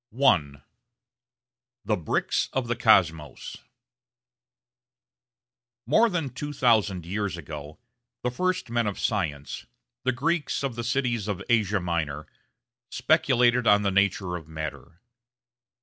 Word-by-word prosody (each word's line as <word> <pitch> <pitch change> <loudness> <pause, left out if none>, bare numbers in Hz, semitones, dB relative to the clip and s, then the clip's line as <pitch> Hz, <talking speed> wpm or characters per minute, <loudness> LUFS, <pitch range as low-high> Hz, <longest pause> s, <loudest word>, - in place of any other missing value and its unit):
§ - - -70
1 85 - +2 1.2
The 105 - +2
Bricks 85 -6 -1
of 130 -2 -1
the 120 - 0
Cosmos 85 - +2 2.3
More 220 - +4
than 165 -8 -2
two 145 +3 -5
thousand 105 - +2
years 100 0 -2
ago 75 -1 -8 0.5
the 125 - 0
first 185 -1 -1
men 120 -2 +1
of 100 - -3
science, 75 -10 -2 0.4
the 130 - +2
Greeks 150 +4 -1
of 135 -3 -1
the 120 - -4
cities 120 -4 -1
of 100 -2 -3
Asia 105 -3 +2
Minor, 80 -4 -2 0.6
speculated 125 -7 +3
on 105 0 +5
the 100 - +1
nature 95 -2 +1
of 80 -3 -8
matter. 80 +2 -7
105 Hz, 120 wpm, -26 LUFS, 85-125 Hz, 2.3 s, on